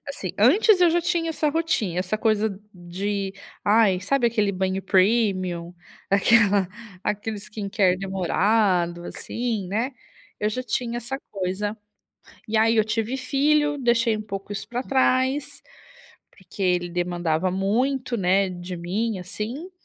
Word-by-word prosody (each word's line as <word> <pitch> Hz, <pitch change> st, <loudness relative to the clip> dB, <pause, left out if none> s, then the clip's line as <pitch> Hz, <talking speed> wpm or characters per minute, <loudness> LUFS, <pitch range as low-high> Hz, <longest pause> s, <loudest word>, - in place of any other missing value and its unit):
assim, 190 Hz, -10 st, -4 dB
antes 365 Hz, -, +5 dB
eu 345 Hz, -2 st, +6 dB
já 345 Hz, -, +2 dB
tinha 335 Hz, -1 st, 0 dB
essa 305 Hz, -1 st, 0 dB
rotin 295 Hz, -, 0 dB
essa 185 Hz, +4 st, -1 dB
coisa 215 Hz, -2 st, 0 dB
de, 195 Hz, +2 st, -4 dB, 0.3 s
ai, 205 Hz, -3 st, +4 dB
sabe 245 Hz, +6 st, +1 dB
aquele 215 Hz, -4 st, +1 dB
banho 190 Hz, 0 st, -1 dB
premium? 185 Hz, -3 st, +1 dB, 0.4 s
Aquela 200 Hz, -2 st, +4 dB, 0.3 s
aquele 210 Hz, +1 st, -2 dB
skincare 200 Hz, -3 st, 0 dB
demorado, 190 Hz, -2 st, +1 dB
assim, 225 Hz, 0 st, -3 dB
né. 225 Hz, +7 st, -1 dB, 0.5 s
Eu 210 Hz, -, +1 dB
já 255 Hz, +4 st, -3 dB
tinha 240 Hz, 0 st, -2 dB
essa 265 Hz, +3 st, -5 dB
coisa. 200 Hz, +2 st, -2 dB, 0.7 s
E, 220 Hz, -, -2 dB
aí, 225 Hz, +1 st, +4 dB
eu 215 Hz, -1 st, +3 dB
tive 225 Hz, +3 st, -1 dB
filho, 295 Hz, +3 st, +2 dB
deixei 235 Hz, -2 st, +2 dB
um 215 Hz, -, -4 dB
pouco 195 Hz, -1 st, -7 dB
isso 205 Hz, -, -5 dB
pra 245 Hz, +1 st, -3 dB
trás, 265 Hz, +2 st, +1 dB, 0.7 s
porque 190 Hz, +1 st, -15 dB
ele 180 Hz, -1 st, +1 dB
demandava 175 Hz, 0 st, -1 dB
muito, 240 Hz, +7 st, 0 dB
né, 195 Hz, 0 st, +2 dB
de 180 Hz, 0 st, -6 dB
mim, 200 Hz, +6 st, -2 dB
assim. 230 Hz, -, -6 dB
210 Hz, 135 wpm, -24 LUFS, 190-245 Hz, 0.7 s, eu